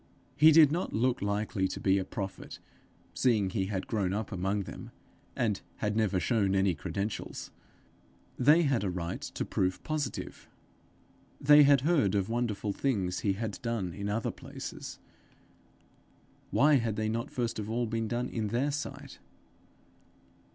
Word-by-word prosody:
He 155 +2 +7
did 155 -2 +7
not 175 +4 -2
look 125 +3 +1
likely 100 -1 0
to - - -6
be 95 0 +3
a - - -1
prophet, 95 +1 -6 0.6
seeing 110 -7 +2
he 95 -2 -1
had 95 -2 -3
grown 100 -5 -1
up 105 +1 -3
among 95 +2 -1
them, - - -9 0.5
and 105 -4 0
had 105 -1 -2
never 105 -4 +1
shown 100 -1 +1
any 95 -1 +3
credentials: 100 +6 -4 0.8
they 150 +7 +5
had 135 -8 +1
a 100 - 0
right 85 -2 -4
to - - -4
proof 90 0 -1
positive! 150 -4 -4 0.9
They 145 +1 +7
had 140 -2 +6
heard 140 - +2
of 100 0 0
wonderful 110 -3 -1
things 95 -10 -1
he 100 - +1
had 110 +1 -5
done 115 -7 -2
in 100 +2 -4
other 110 +2 -1
places: - - -8 1.5
why 150 0 +5
had 115 -4 -1
they 110 0 -1
not 115 +5 -2
first 120 -3 -2
of 105 0 -5
all 120 +2 0
been 115 0 -2
done 120 +2 -1
in 110 -2 -3
their 125 +7 0
sight? 145 0 -6
110 Hz, 155 wpm, -30 LUFS, 100-125 Hz, 1.5 s, He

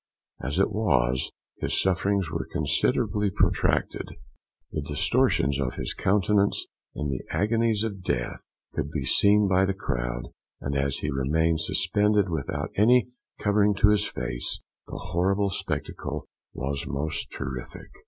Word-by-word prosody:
As 70 +5 -2
it 95 - +3
was, 65 - +1 0.3
his - - 0
sufferings 95 -1 +1
were 85 - -3
considerably 105 -1 +1
protracted. - - +1 0.6
The 75 - -2
distortions 70 -1 +2
of 65 -2 -1
his - - -3
countenance, 100 +1 +2 0.3
in 75 -1 -2
the 65 - -2
agonies 110 0 +1
of 100 -4 -4
death, - - -2 0.3
could 70 - -2
be 75 -3 -3
seen 105 +7 +5
by 95 0 +4
the 95 0 -1
crowd; - - -3 0.3
and, 70 +1 -3
as 70 0 0
he 75 - -2
remained 80 +4 +1
suspended 105 +2 +2
without 80 - -3
any 125 +4 +4 0.3
covering 105 0 +3
to 105 +1 +5
his 105 -1 +4
face, 60 -1 -4 0.2
the - - -6
horrible 95 +3 0
spectacle - - -4 0.3
was 70 +1 -3
most 70 +3 -3
terrific. 65 -3 -6
90 Hz, 135 wpm, -26 LUFS, 70-100 Hz, 0.6 s, seen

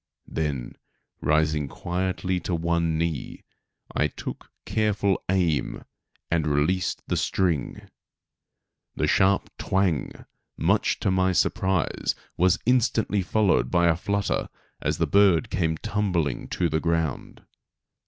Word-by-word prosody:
Then, 70 -6 -3 0.4
rising 75 -1 +2
quietly 90 +3 -2
to 90 - -2
one 85 -1 0
knee, 80 -2 -3 0.5
I - - +3
took - - -8 0.2
careful 105 -3 +1
aim 90 -6 0 0.5
and 80 -2 +1
released 75 +6 0
the - - -1
string. 85 -7 -1 1.1
The - - 0
sharp 95 0 +2
"twang," 95 -5 -1 0.3
much - - +1
to 95 - +1
my 95 0 +2
surprise 95 -1 0 0.2
was 95 +1 +3
instantly 115 -5 +2
followed 95 - +2
by 85 -1 +3
a 80 - +3
flutter 100 +4 -1 0.3
as - - -1
the - - +2
bird 100 -5 +4
came 80 -3 0
tumbling 85 -9 -1
to 90 - 0
the 80 0 0
ground. 80 -4 -2
90 Hz, 115 wpm, -25 LUFS, 80-95 Hz, 1.1 s, bird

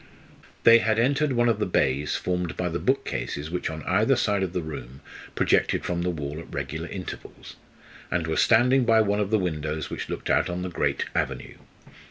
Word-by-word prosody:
They 115 0 +8
had 110 -1 +1
entered 140 +4 +2
one 120 -1 +2
of 115 -3 +1
the 105 - 0
bays 70 -4 +1
formed 90 -2 -2
by - - -1
the - - -3
bookcases 75 +3 -2
which 90 - -2
on 80 -1 -6
either 110 +8 +3
side 105 -5 +1
of 95 -3 -1
the 90 -1 -3
room 70 -4 -8 0.3
projected - - +2
from 85 -1 -1
the 90 - 0
wall 75 -3 -4
at 85 - -11
regular 75 +4 -4
intervals, 90 -1 -8 0.5
and 85 -2 -1
were 80 0 -1
standing 125 +3 +4
by 115 -1 +4
one 105 -1 +1
of 100 -2 0
the 110 - +3
windows 80 -4 -3
which - - -5
looked - - -3
out - - +2
on 90 +1 -3
the 90 - -3
great 85 - -1
avenue. - - -3
90 Hz, 200 wpm, -25 LUFS, 80-110 Hz, 0.5 s, They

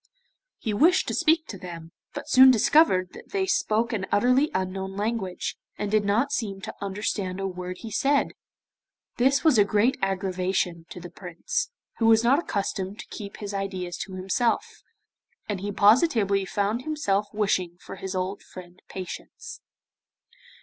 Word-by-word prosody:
He 220 - -3
wished 330 - +4
to - - -2
speak 325 -1 +3
to 195 - -7
them, 170 -2 -9 0.2
but 290 0 -6
soon 260 -2 +8
discovered 225 - +4
that - - -12
they 390 -1 0
spoke 235 - +1
an 195 -4 -2
utterly 250 +8 +3
unknown 190 +1 -3
language, 205 -3 -2 0.2
and 205 -1 -3
did 215 -1 +3
not 230 +8 +1
seem 210 -8 -2
to - - -6
understand 195 -1 -3
a 195 - -2
word 180 -1 -5
he 225 - -7
said. 280 +6 +2 0.9
This 265 +3 +3
was 305 -9 +5
a - - +8
great 215 +7 +2
aggravation 185 -3 -1
to - - -8
the 175 0 -10
Prince, 485 - -3 0.3
who 225 - +3
was 225 0 +5
not 265 +5 +4
accustomed 200 - -3
to - - -8
keep 200 -2 -8
his 205 -1 -6
ideas 190 -3 -3
to 195 -1 -6
himself, 195 +6 0 0.8
and 205 -3 -2
he 205 +1 -3
positively 205 - +3
found 205 +4 -1
himself 210 -9 -1
wishing 185 -4 0
for 195 - -10
his 190 0 -5
old 185 +2 -2
friend 180 -1 -13
Patience. 450 - -8
205 Hz, 160 wpm, -26 LUFS, 190-245 Hz, 0.9 s, soon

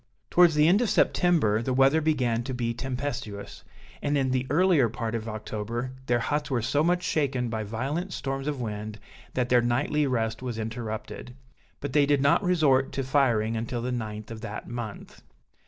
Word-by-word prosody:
Towards 175 -3 +6
the 150 +1 +5
end 195 +6 +5
of 240 - +1
September, 150 - +3
the 125 +2 -1
weather 135 +4 +4
began 125 -7 +1
to 130 -1 -3
be 120 -1 -1
tempestuous, 125 -5 -5 0.4
and 145 0 +1
in 130 -2 +1
the 130 0 0
earlier 160 -5 +4
part 115 0 -4
of 115 -1 -3
October, 110 +3 -4 0.2
their 120 - +3
huts 150 +5 -1
were 125 -5 0
so 145 +5 +1
much 175 +2 +1
shaken 130 -5 0
by 110 -1 -2
violent 135 - -3
storms 135 -2 -3
of 145 -3 -2
wind, 105 -2 -5 0.4
that 125 -1 0
their 125 -1 +5
nightly 140 +5 +1
rest 115 -3 -1
was 125 -3 -4
interrupted; 115 +2 -5 0.5
but 140 -2 -4
they 145 -1 +4
did 145 -1 +3
not 140 +1 +3
resort 150 -7 +3
to 135 - -1
firing 120 -5 +2
until 115 +1 -3
the 125 - -2
9th 110 -3 -5
of 110 -1 -7
that 105 - -6
month. 120 -4 -7
125 Hz, 185 wpm, -27 LUFS, 115-145 Hz, 0.5 s, Towards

